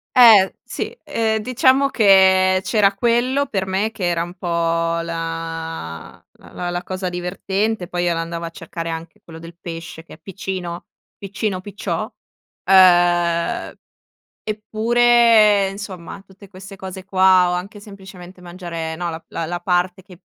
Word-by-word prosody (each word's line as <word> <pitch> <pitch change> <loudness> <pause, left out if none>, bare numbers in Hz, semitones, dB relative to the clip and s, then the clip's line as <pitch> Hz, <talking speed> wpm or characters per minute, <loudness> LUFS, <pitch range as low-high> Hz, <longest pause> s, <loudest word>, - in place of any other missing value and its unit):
Eh 220 -6 +7
sì, - - -6
ehm, 220 -1 0
diciamo 260 +4 +3
che 190 -6 +4
c'era 205 -2 +3
quello 240 +6 +1
per 195 -8 -2
me 195 +3 -1
che 215 -4 -8
era 170 -1 0
un 175 +1 -8
po' 185 - -11 0.6
la 165 - -6
la 175 - -7
la 175 +1 -3
cosa 185 0 -4
divertente. 190 +3 -2
Poi 175 0 -3
io 175 -1 +1
l'andavo 165 0 -4
a 165 - -4
cercare 165 0 -7
anche 165 0 -7
quello 165 -1 -12
del 165 +1 -12
pesce, 165 -1 -8
che 170 - -13
è - - -23
piccino, 180 -1 -6 0.3
piccino, 195 -1 -4
picciò, 205 +1 -5 0.6
uhm, 175 -2 +4 0.7
eppure, 220 -1 +3
insomma, 195 -2 -8
tutte 195 +1 -17
queste 190 0 -11
cose 190 0 -8
qua, 185 -1 +4
o - - -1
anche 190 +4 -5
semplicemente 190 -3 -13
mangiare, 175 -2 -6
no, 175 +1 -3
la 165 0 -7
la 165 - -4
la 175 +1 -4
parte 180 +1 -1
che, 185 -2 -16
185 Hz, 145 wpm, -20 LUFS, 170-205 Hz, 0.7 s, Eh